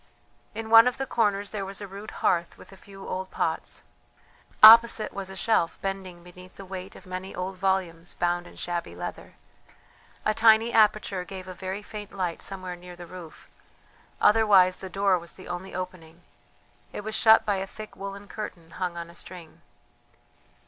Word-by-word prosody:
In 225 Hz, 0 st, -6 dB
one 230 Hz, +1 st, +9 dB
of 250 Hz, -, 0 dB
the 270 Hz, -, -2 dB
corners 205 Hz, -5 st, 0 dB
there 205 Hz, -2 st, -3 dB
was 195 Hz, 0 st, -5 dB
a 200 Hz, -, -7 dB
rude 200 Hz, +3 st, -9 dB, 0.2 s
hearth 170 Hz, 0 st, +1 dB
with -, -, -15 dB
a -, -, -12 dB
few 195 Hz, 0 st, -12 dB
old 185 Hz, 0 st, -4 dB
pots; -, -, -2 dB, 0.8 s
opposite 225 Hz, 0 st, +9 dB
was 195 Hz, -1 st, -5 dB
a 190 Hz, -, -8 dB
shelf 190 Hz, -4 st, +1 dB
bending 190 Hz, -3 st, -5 dB
beneath 180 Hz, +1 st, -14 dB
the 195 Hz, -, -10 dB
weight 190 Hz, 0 st, -8 dB
of -, -, -14 dB
many 185 Hz, +1 st, -6 dB
old 185 Hz, +1 st, -4 dB
volumes 185 Hz, -3 st, -1 dB
bound 175 Hz, 0 st, -1 dB
in -, -, -15 dB
shabby 170 Hz, -, -4 dB
leather; 90 Hz, -, -7 dB, 0.9 s
a 215 Hz, -, +3 dB
tiny 225 Hz, +1 st, +5 dB
aperture 210 Hz, -3 st, +3 dB
gave 185 Hz, 0 st, -9 dB
a 185 Hz, -, -6 dB
very 190 Hz, +3 st, -5 dB
faint 210 Hz, -1 st, -8 dB
light 180 Hz, -3 st, -3 dB
somewhere 185 Hz, -2 st, -5 dB
near 175 Hz, 0 st, -12 dB
the 175 Hz, 0 st, -10 dB
roof, 170 Hz, -2 st, -12 dB, 0.7 s
otherwise 205 Hz, -4 st, +5 dB
the 190 Hz, -, -8 dB
door 195 Hz, -1 st, +2 dB
was 170 Hz, 0 st, -10 dB
the 185 Hz, -, -13 dB
only 180 Hz, +1 st, -6 dB
opening; 180 Hz, -2 st, -7 dB, 0.7 s
it -, -, -6 dB
was 215 Hz, +1 st, -6 dB
shut 220 Hz, 0 st, +6 dB
by 205 Hz, -2 st, +1 dB
a 190 Hz, +1 st, -3 dB
thick 215 Hz, +2 st, -10 dB
woollen 200 Hz, +1 st, -8 dB
curtain 175 Hz, -6 st, -8 dB
hung 175 Hz, 0 st, -4 dB
on 170 Hz, 0 st, -5 dB
a 170 Hz, -, -14 dB
string. 175 Hz, -2 st, -10 dB
190 Hz, 180 wpm, -26 LUFS, 180-205 Hz, 0.9 s, one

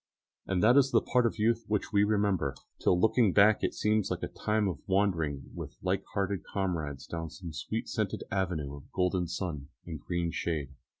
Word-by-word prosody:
And 95 Hz, -1 st, +1 dB
that 120 Hz, +5 st, +6 dB
is 135 Hz, -1 st, +5 dB
the -, -, +5 dB
part 125 Hz, -2 st, +2 dB
of 115 Hz, -, -4 dB
youth 115 Hz, +2 st, +2 dB
which 105 Hz, +1 st, -1 dB
we 100 Hz, 0 st, +5 dB
remember, 105 Hz, -3 st, +1 dB, 0.2 s
till -, -, +3 dB
on 90 Hz, -, 0 dB
looking 110 Hz, -3 st, +4 dB
back 105 Hz, +1 st, +6 dB
it -, -, -1 dB
seems 105 Hz, -1 st, +1 dB
like -, -, -3 dB
a -, -, 0 dB
time 105 Hz, -1 st, 0 dB
of 85 Hz, -7 st, -3 dB
wandering 85 Hz, -8 st, 0 dB
with -, -, -7 dB
like 95 Hz, +1 st, 0 dB
hearted 100 Hz, -2 st, -1 dB
comrades 80 Hz, -8 st, -3 dB
down 80 Hz, -1 st, -5 dB
some 85 Hz, 0 st, -8 dB
sweet 110 Hz, +10 st, -3 dB
scented 110 Hz, -4 st, -2 dB
avenue 85 Hz, -7 st, -1 dB
of 70 Hz, -, -15 dB
golden 90 Hz, -1 st, +1 dB
sun 85 Hz, -5 st, -4 dB, 0.2 s
and 80 Hz, -3 st, -6 dB
green 85 Hz, 0 st, -1 dB
shade. 75 Hz, -4 st, -2 dB
95 Hz, 195 wpm, -30 LUFS, 85-105 Hz, 0.2 s, that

